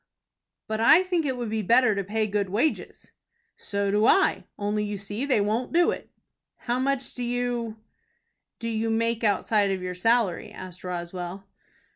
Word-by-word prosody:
"But 220 0 -2
I 310 +10 +6
think 350 -5 0
it 260 -2 -2
would 235 -3 -4
be 220 0 0
better 230 +3 +4
to 200 0 -2
pay 215 +3 -1
good 205 -2 -1
wages." 235 +11 -2 0.4
"So 200 -1 -2
do 210 +3 +3
I, 390 - +3
only 210 +1 -1
you 205 -1 -3
see 205 +7 -4
they 255 -7 +3
won't 220 +7 -1
do 345 +1 +4
it." - - -7 0.5
"How 245 +1 -2
much 275 0 -1
do 250 - -7
you 240 -2 -2 0.8
do 230 - -5
you 225 0 -1
make 230 +1 0
outside 205 0 +2
of 190 -1 -2
your 180 0 -3
salary?" 220 0 +1
asked 185 -1 -10
Roswell. 180 +1 -5
220 Hz, 170 wpm, -26 LUFS, 200-245 Hz, 0.8 s, I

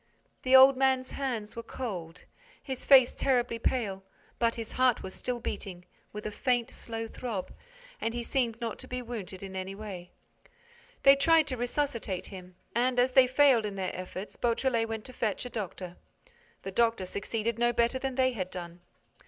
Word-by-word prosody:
The 260 +1 +4
old 265 0 +9
man's 260 -1 +2
hands 240 -6 -3
were 230 - -4
cold, 185 -10 -6 0.4
his 265 -3 -6
face 260 -3 +7
terribly 245 -3 +1
pale, 205 -7 -1 0.4
but 230 -1 +2
his 225 -2 -6
heart 255 -2 +2
was 190 - -7
still 250 -1 -3
beating, 185 -5 -6 0.3
with 210 0 -7
a 215 - -2
faint, 245 +2 0
slow 225 -1 -5
throb, 220 -5 -5 0.5
and 230 +1 -1
he 240 - -2
seemed 235 -3 -1
not 230 -2 -4
to - - -7
be 250 0 -4
wounded 205 -6 -7
in 190 -1 -7
any 190 +1 -4
way. 195 -4 -8 0.9
They 275 0 +9
tried 320 +3 +4
to 255 - -1
resuscitate 245 -5 -2
him 180 -1 -10 0.2
and, 250 +2 +1
as 250 +1 +3
they 255 0 +6
failed 260 -3 +5
in 205 -2 -4
their 190 -1 -3
efforts, 185 +2 -7
Beautrelet 235 -1 +1
went 220 -1 -4
to 255 - -10
fetch 220 -1 -2
a 245 - -7
doctor. 185 -4 -6 0.7
The 195 - -5
doctor 225 -2 +2
succeeded 220 +4 -3
no 240 0 +3
better 235 +2 +1
than 265 -1 -3
they 260 0 +3
had 185 -6 -4
done. 175 -1 -8
230 Hz, 180 wpm, -29 LUFS, 195-255 Hz, 0.9 s, old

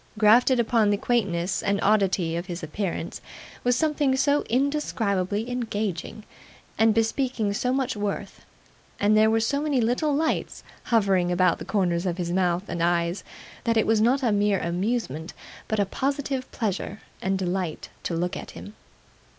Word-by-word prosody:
Grafted 235 +4 +5
upon 225 -2 +3
the 205 - +2
quaintness 195 -7 0
and 200 0 0
oddity 195 -5 +2
of 170 +2 -4
his 175 -2 -6
appearance, 170 +1 -4 0.4
was 245 0 +3
something 295 -2 +1
so 285 +2 +2
indescribably 225 -7 0
engaging, 215 -5 -3 0.5
and 220 -1 +3
bespeaking 225 -1 0
so 250 +4 0
much 265 -1 0
worth, 205 -1 -4 0.6
and 205 +1 +3
there 215 0 +5
were 225 0 +3
so 280 +6 0
many 295 -3 +1
little 245 +6 +1
lights 315 +2 -1 0.2
hovering 195 -6 +2
about 180 0 +2
the - - -7
corners 180 -3 0
of 175 -1 -2
his 175 -2 -2
mouth 180 0 +1
and 170 - -4
eyes, 170 +2 +1 0.4
that 230 -2 +1
it 220 - +3
was 220 -1 +3
not 260 +5 +3
a 235 - +3
mere 205 -1 +2
amusement, 175 - -2 0.3
but 220 - -1
a 200 - +3
positive 270 +3 -2
pleasure 205 -2 -3 0.2
and 190 0 0
delight 180 -3 -3
to 170 - -3
look 175 +2 -1
at - - -7
him. 205 - -9
210 Hz, 160 wpm, -25 LUFS, 185-245 Hz, 0.6 s, Grafted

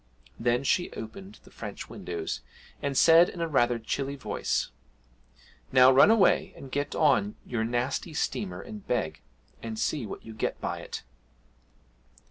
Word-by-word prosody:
Then 120 +2 +1
she 175 +6 +1
opened 190 - -9
the - - -17
French - - -7
windows, 410 -2 -5 0.4
and 140 -1 -1
said 165 +1 +7
in 175 - -9
rather 135 -7 +2
a - - -4
chilly 135 +5 -3
voice, 135 - -2 1.0
'Now 130 0 +7
run 135 +9 +7
away 220 -3 +4
and 135 - -11
get 145 +1 -2
on 125 -10 +3
your 120 -2 -2
nasty 125 +7 -2
steamer 195 +4 -2
and 215 -3 -10
beg, 80 -11 -1 0.4
and 110 -1 -5
see 125 0 -1
what - - -8
you 110 - -8
get 110 - -2
by - - -3
it!' - - -7
135 Hz, 150 wpm, -28 LUFS, 120-170 Hz, 1.0 s, said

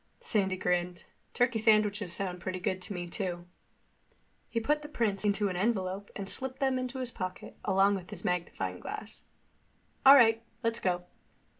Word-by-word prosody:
Sandy 190 -3 0
grinned. 180 -1 -1 0.3
"Turkey 245 -2 +2
sandwiches 210 -3 +3
sound 180 0 -2
pretty 185 +1 -4
good 185 +1 -2
to 180 - -5
me 175 -2 -4
too." 175 -1 -4 1.0
He 230 - 0
put 300 +6 +1
the 295 - -9
prints 215 -8 -1
into 205 0 +2
an 185 - -3
envelope 195 -1 -1
and 195 -1 -5
slipped 260 +4 -4
them 265 -1 +1
into 255 +1 -4
his 255 -1 -3
pocket, 185 -4 -6
along 195 +1 +4
with 185 -3 -5
his - - -7
magnifying 180 -1 -2
glass. - - -7 0.8
"All 275 +1 +11
right. 225 -4 +6 0.2
Let's 230 0 +1
go." 180 -1 0
200 Hz, 165 wpm, -30 LUFS, 185-230 Hz, 1.0 s, All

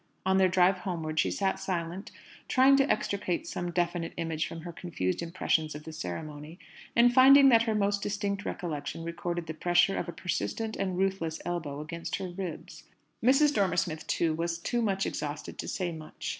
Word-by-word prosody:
On 190 0 +3
their 190 -1 +5
drive 185 +1 +3
homeward, 160 -4 -3
she - - +3
sat 195 -1 -1
silent, 175 +1 -3 0.4
trying 265 +2 +5
to 275 +1 +3
extricate 200 - -1
some 175 - -4
definite 175 -1 -1
image 165 -1 -2
from 165 - -7
her 170 +1 -7
confused 125 - -3
impressions 165 -3 0
of 150 - -8
the 160 - -8
ceremony, 150 - -6 0.4
and 240 +1 +5
finding 275 +2 +8
that 230 -3 +6
her 225 -2 0
most 200 -1 +1
distinct 205 -1 -2
recollection 160 -3 -4
recorded 170 0 -3
the 160 - -5
pressure 175 +4 +3
of 175 - -3
a - - -2
persistent 220 +5 -3
and 185 -2 -2
ruthless 185 -4 -1
elbow 155 -5 -3
against 165 +2 -5
her 185 - -4
ribs. 175 -2 -7 0.4
Mrs. 280 +4 +5
Dormer 195 -6 +1
Smith, 160 -2 -1
too, 165 -2 +1
was 170 +1 -2
too 240 +8 -1
much 195 -3 0
exhausted 145 0 -5
to - - -4
say 180 -3 -2
much. 155 -1 -7
175 Hz, 185 wpm, -29 LUFS, 165-200 Hz, 0.4 s, finding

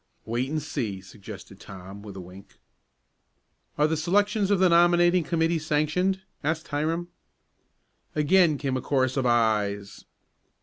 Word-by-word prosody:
"Wait 120 +4 -2
and 155 -1 -2
see," 120 -10 -3
suggested 95 0 -12
Tom 95 +1 -10
with 100 -2 -10
a - - -7
wink. 90 +2 -13 1.2
"Are 150 - +3
the 155 +1 +1
selections 200 +5 +1
of 200 - +3
the 185 0 +4
nominating 175 +1 +4
committee 165 0 0
sanctioned?" 155 +5 0 0.2
asked 160 +2 -2
Hiram. 160 +4 -2 1.1
Again 155 +1 +4
came 135 -2 -2
a 130 - -2
chorus 130 -1 0
of 130 -2 0
"ayes." 105 -4 0
150 Hz, 135 wpm, -26 LUFS, 110-170 Hz, 1.2 s, the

